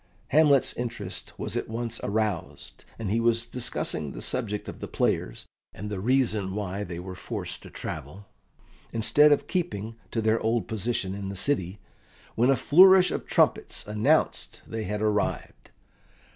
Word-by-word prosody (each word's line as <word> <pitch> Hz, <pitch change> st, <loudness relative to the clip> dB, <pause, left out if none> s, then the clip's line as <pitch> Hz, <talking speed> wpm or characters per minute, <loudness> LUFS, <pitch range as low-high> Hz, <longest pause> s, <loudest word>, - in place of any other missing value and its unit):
Hamlet's 145 Hz, -2 st, +4 dB
interest 120 Hz, -1 st, -4 dB
was -, -, -4 dB
at -, -, -2 dB
once 115 Hz, +1 st, -3 dB
aroused, 105 Hz, -4 st, -3 dB
and 110 Hz, -4 st, -3 dB
he 115 Hz, -, +2 dB
was 115 Hz, 0 st, +2 dB
discussing 115 Hz, -, -1 dB
the -, -, -7 dB
subject 105 Hz, -5 st, -2 dB
of -, -, -7 dB
the -, -, -5 dB
players, -, -, -1 dB, 0.3 s
and 105 Hz, +3 st, -6 dB
the 100 Hz, -, -3 dB
reason 110 Hz, -4 st, +1 dB
why 100 Hz, -1 st, -3 dB
they 85 Hz, -3 st, -6 dB
were 90 Hz, +1 st, -7 dB
forced 90 Hz, -, -5 dB
to -, -, -11 dB
travel, 90 Hz, +9 st, -7 dB, 0.7 s
instead 145 Hz, +7 st, +4 dB
of 145 Hz, -, +3 dB
keeping 115 Hz, -, -3 dB
to 115 Hz, -, -2 dB
their 110 Hz, +1 st, +2 dB
old 115 Hz, 0 st, 0 dB
position 110 Hz, -3 st, -2 dB
in 100 Hz, -1 st, -5 dB
the 100 Hz, -, -5 dB
city, 95 Hz, -4 st, 0 dB, 0.6 s
when 120 Hz, +3 st, +2 dB
a 135 Hz, -, +5 dB
flourish 180 Hz, +8 st, +7 dB
of -, -, -4 dB
trumpets -, -, +1 dB
announced 105 Hz, +1 st, 0 dB
they 110 Hz, -1 st, -5 dB
had 105 Hz, +2 st, -2 dB
arrived. 105 Hz, -1 st, -1 dB
110 Hz, 160 wpm, -27 LUFS, 100-120 Hz, 0.7 s, flourish